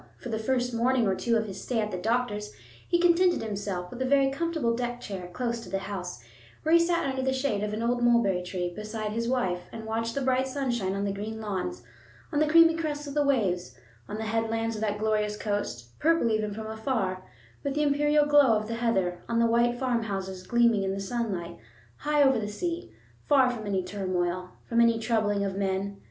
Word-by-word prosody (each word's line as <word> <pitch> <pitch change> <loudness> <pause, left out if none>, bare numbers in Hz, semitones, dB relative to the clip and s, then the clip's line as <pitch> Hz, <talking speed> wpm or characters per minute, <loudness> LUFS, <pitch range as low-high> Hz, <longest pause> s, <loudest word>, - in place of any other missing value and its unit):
For 245 - -8
the 220 -1 -2
first 245 +1 0
morning 240 +1 +2
or 195 - +2
two 230 +4 +1
of 220 - -1
his 195 -2 -7
stay 245 -3 -1
at 210 -1 -1
the 185 - -3
doctor's 210 0 -1 0.4
he 345 - +3
contented 350 -3 +4
himself 200 -4 -4
with 250 - -7
a - - +1
very 270 0 +3
comfortable 315 -6 0
deck 245 0 -3
chair 190 -6 -6
close 235 +4 -2
to - - -10
the 195 - -1
house, 190 -8 -6 0.4
where 315 - +2
he 335 - +8
sat 335 -2 +1
under 265 -1 -1
the 265 0 +1
shade 260 -6 0
of 210 - -2
an 215 +2 -3
old 240 +1 +1
mulberry 235 -6 +3
tree 180 -1 -3
beside 215 0 -4
his 230 +2 -2
wife 190 -9 0
and 225 - -7
watched 230 +1 -2
the 280 - -1
bright 260 0 +2
sunshine 245 -8 -1
on 200 +1 -1
the 200 - -1
green 215 +2 -5
lawns, 185 - -4 0.5
on 290 - +1
the 305 - +3
creamy 330 +1 +7
crests 300 -2 -3
of 285 - -6
the 295 - +2
waves, 185 - 0 0.3
on 210 - -4
the 220 - -3
headlands 225 +1 -1
of 215 - -5
that 210 -1 0
glorious 210 -1 0
coast, 205 - -3
purple 330 -7 +3
even 215 -1 0
from 220 +2 -6
afar 220 -4 -2 0.4
with 280 -1 -2
the 300 - +2
imperial 295 +1 +3
glow 290 -6 +5
of 215 0 -4
the 230 0 -3
heather, 190 -7 0
on 230 - 0
the 230 - +4
white 235 +1 +2
farmhouses 205 -7 -2
gleaming 235 -3 +4
in 195 0 -1
the - - -4
sunlight, 195 - -3 0.4
high 295 -1 +2
over 265 -3 +4
the 210 - -3
sea, 340 +11 -4 0.4
far 265 -3 +5
from 220 -4 -6
any 190 -2 0
turmoil, 185 -1 -2 0.2
from 235 0 +3
any 230 -1 +4
troubling 215 -3 +1
of 195 -1 -3
men. 195 0 -2
225 Hz, 215 wpm, -28 LUFS, 200-260 Hz, 0.5 s, he